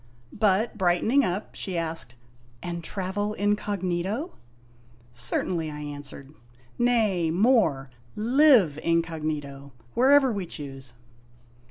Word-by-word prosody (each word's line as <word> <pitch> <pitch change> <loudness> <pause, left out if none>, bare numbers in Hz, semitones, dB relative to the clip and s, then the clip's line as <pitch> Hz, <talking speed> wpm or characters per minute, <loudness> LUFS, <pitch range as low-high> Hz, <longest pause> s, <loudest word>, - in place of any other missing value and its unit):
But, 215 +1 +1
brightening 190 +10 +3
up, 185 +1 -3
she 185 -3 -4
asked: 165 -7 -3 0.5
"And 170 -1 -5
travel 200 +4 -3
incog./ 205 -1 -1 1.3
"Certainly," 155 +7 -1
I 150 0 -7
answered; 145 -1 -8 0.5
"nay, 220 -9 +2
more: 175 - +2 0.2
live 230 - +4
incog, 165 -1 0 0.7
wherever 270 +1 +5
we 200 -5 -4
choose 135 -5 -8
185 Hz, 90 wpm, -26 LUFS, 155-215 Hz, 1.3 s, wherever